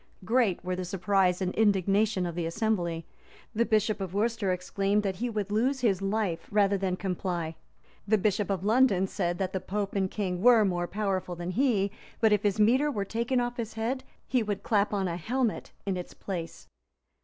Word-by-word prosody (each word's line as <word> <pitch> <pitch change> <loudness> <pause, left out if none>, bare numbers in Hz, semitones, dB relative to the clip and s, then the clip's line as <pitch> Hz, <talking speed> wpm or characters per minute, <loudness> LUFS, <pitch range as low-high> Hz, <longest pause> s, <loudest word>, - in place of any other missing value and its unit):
Great 225 -6 +1
were 185 0 -1
the 185 - -3
surprise 190 0 +1
and 185 - -1
indignation 200 -1 +2
of 170 - -3
the 170 -1 -2
assembly: 170 -3 -1 0.5
the 235 +1 +1
bishop 215 -1 +1
of 190 -1 -4
Worcester 220 -2 +1
exclaimed, 195 +3 0
that 190 -2 -2
he 245 +4 -2
would 210 -3 -3
lose 255 +5 +1
his 200 -6 +2
life 195 -4 -1
rather 205 -1 +3
than 190 -2 -1
comply: 180 -3 -3 0.5
the 215 +1 +4
bishop 205 0 0
of 195 -1 -1
London 215 -4 +4
said, 175 -3 -2
that 190 0 -2
the 190 - 0
pope 200 +2 -3
and 190 -2 0
king 185 -4 -2
were 235 -2 +6
more 175 -2 -1
powerful 190 -3 -2
than 175 +1 -4
he; 205 -4 +2 0.3
but 220 -2 +4
if 205 - +2
his 205 0 0
mitre 255 +8 +4
were 205 -8 -2
taken 235 +5 0
off 245 0 -2
his 230 -2 -4
head, 245 +4 -2 0.2
he 255 -2 +1
would 205 -2 -3
clap 205 -2 +2
on 195 -2 0
a 170 -1 -3
helmet 240 +5 -1 0.2
in 195 -2 -1
its 180 -1 -7
place. 170 -4 -6
200 Hz, 195 wpm, -28 LUFS, 185-220 Hz, 0.5 s, were